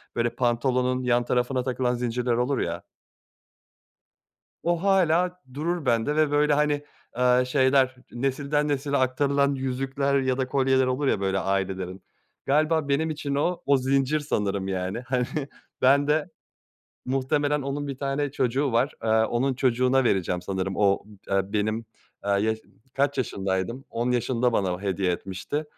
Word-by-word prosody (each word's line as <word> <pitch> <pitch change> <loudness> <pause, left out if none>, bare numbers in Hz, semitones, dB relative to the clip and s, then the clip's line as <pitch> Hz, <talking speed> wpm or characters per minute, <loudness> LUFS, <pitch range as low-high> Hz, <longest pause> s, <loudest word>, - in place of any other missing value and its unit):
Böyle, 120 0 +1
pantolonun 125 +1 0
yan 120 -1 +2
tarafına 125 +1 0
takılan 125 -1 0
zincirler 120 0 -1
olur 125 +3 0
ya. 85 0 -2 1.8
O, 170 +1 0
hâlâ 180 -2 +2
durur 165 +2 -2
bende 120 +4 +1
ve 155 -1 +2
böyle, 150 0 +3
hani, 145 0 +1 0.3
ııı, 125 0 +4
şeyler, 130 0 +3 0.2
nesilden 140 +4 -1
nesile 140 0 0
aktarılan 140 +2 +2
yüzükler 135 +1 -1
ya 130 -1 0
da 130 -1 -1
kolyeler 130 -1 +2
olur 130 +2 0
ya, 105 - +2
böyle, 95 0 0
ailelerin, 95 -1 -2 0.4
galiba 155 +1 +2
benim 155 +3 +1
için 145 -2 -3
o, 175 +5 0
o 140 -1 +4
zincir 135 +3 +1
sanırım, 100 -9 -1
yani. 95 +2 -2
Hani, 125 -2 +1 0.6
ben 140 +2 +4
de 155 +3 +1 0.8
muhtemelen, 145 +3 0
onun 140 +2 -3
1 135 -2 -5
tane 140 +1 -1
çocuğu 130 0 0
var. 120 +4 +2
Aaa, 110 0 +2
onun 130 +4 0
çocuğuna 130 +1 +2
vereceğim 90 -5 0
sanırım. 95 0 -3
O 100 -1 +2 0.2
d - - -6
aaa, 95 0 0
benim, 110 +2 -1 0.4
aaa, 100 0 +1
yaş 110 +1 0 0.4
kaç 140 0 +1
yaşındaydım? 100 +2 -2
10 120 +2 -1
yaşında 125 0 +1
bana 95 -3 0
hediye 95 -2 0
etmişti. 95 - -4
130 Hz, 145 wpm, -25 LUFS, 115-140 Hz, 1.8 s, ııı